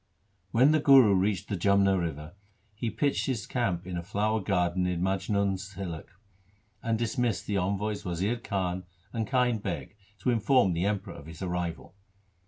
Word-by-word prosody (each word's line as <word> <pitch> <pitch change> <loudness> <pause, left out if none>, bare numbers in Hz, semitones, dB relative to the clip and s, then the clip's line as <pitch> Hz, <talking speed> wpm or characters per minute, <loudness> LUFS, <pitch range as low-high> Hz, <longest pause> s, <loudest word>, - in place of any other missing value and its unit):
When 125 +9 +5
the 155 - +4
Guru 135 -7 +7
reached 95 +1 +1
the 100 - -2
Jamna 100 +1 +3
river, 80 -2 -3 0.4
he 115 +3 -3
pitched 125 +6 0
his 120 -6 -2
camp 95 -9 -1
in 90 -1 -4
a - - -2
flower 105 +4 0
garden 90 -2 0
near 90 -1 0
Maj 95 +1 -1
nun's 100 -1 0
hillock, 85 -5 -6 0.7
and 115 -1 0
dismissed 115 -1 -1
the 100 - -1
envoys 100 +2 -1
Wazir 95 +5 -1
Khan 95 -5 -2 0.3
and 115 -2 -2
Kind 125 -4 +1
Beg 100 +1 -5 0.3
to 125 - +2
inform 115 -4 +3
the 85 +3 0
Emperor 100 -3 -2
of 70 - -11
his 80 +3 -8
arrival. 90 -2 -3
100 Hz, 170 wpm, -28 LUFS, 90-110 Hz, 0.7 s, Guru